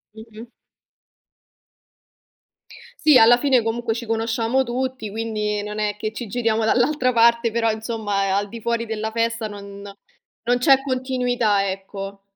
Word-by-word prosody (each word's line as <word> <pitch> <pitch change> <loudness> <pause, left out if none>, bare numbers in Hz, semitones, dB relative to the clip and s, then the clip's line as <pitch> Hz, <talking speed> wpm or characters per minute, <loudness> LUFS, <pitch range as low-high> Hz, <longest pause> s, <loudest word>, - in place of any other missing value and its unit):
Mh-mh. 220 +1 -11 2.6
Sì, 305 -3 +6
alla 235 +2 +7
fine, 260 -2 +3
comunque, 225 0 -2
ci 235 0 -6
conosciamo 225 +3 0
tutti, 255 -3 -4
quindi 210 -2 -2
non 210 +1 -6
è 210 -1 -1
che 215 +1 -3
ci 235 +2 -6
giriamo 225 0 0
dall'altra 255 +2 +2
parte, 235 0 +4
però, 230 0 +1
insomma, 215 -3 -2
a 195 - +2
al 205 0 -5
di 230 - -8
fuori 235 0 -2
della 220 0 -3
festa 230 0 -1
non 200 -1 -10 0.6
non 245 0 +3
c'è 270 +1 +5
continuità, 250 -6 0
ecco. 195 +1 -7
225 Hz, 140 wpm, -22 LUFS, 210-240 Hz, 2.6 s, alla